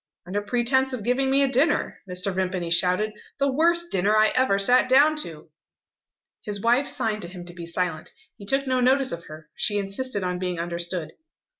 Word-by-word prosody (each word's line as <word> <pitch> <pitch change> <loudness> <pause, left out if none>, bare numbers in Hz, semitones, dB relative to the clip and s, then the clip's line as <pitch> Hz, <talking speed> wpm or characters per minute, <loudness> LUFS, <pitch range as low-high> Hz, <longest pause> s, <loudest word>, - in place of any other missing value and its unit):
"Under 195 +3 -2
pretence 245 +5 +1
of 240 -5 -4
giving 255 +4 +1
me 275 +1 +4
a - - +3
dinner," 270 +5 +1
Mr. 180 +2 -1
Vimpany 185 -2 -2
shouted 180 +5 +2 0.3
"the 280 -1 +1
worst 340 +4 +2
dinner 200 +4 +2
I 215 0 +5
ever 255 -6 +2
sat 245 +6 +4
down 290 +4 +5
to!" 165 - -4 0.9
His 205 -1 -3
wife 240 +6 +2
signed 215 -1 -2
to 175 - -5
him 175 0 -10
to 175 - -11
be 170 -1 -8
silent. 170 -2 -3 0.2
He 200 - -13
took 270 +4 +1
no 255 -1 0
notice 260 +1 +3
of 170 0 -6
her. 155 0 -12
She 205 - 0
insisted 205 +2 -3
on 180 0 -2
being 180 -2 -3
understood. 170 0 -3
205 Hz, 190 wpm, -24 LUFS, 180-260 Hz, 0.9 s, I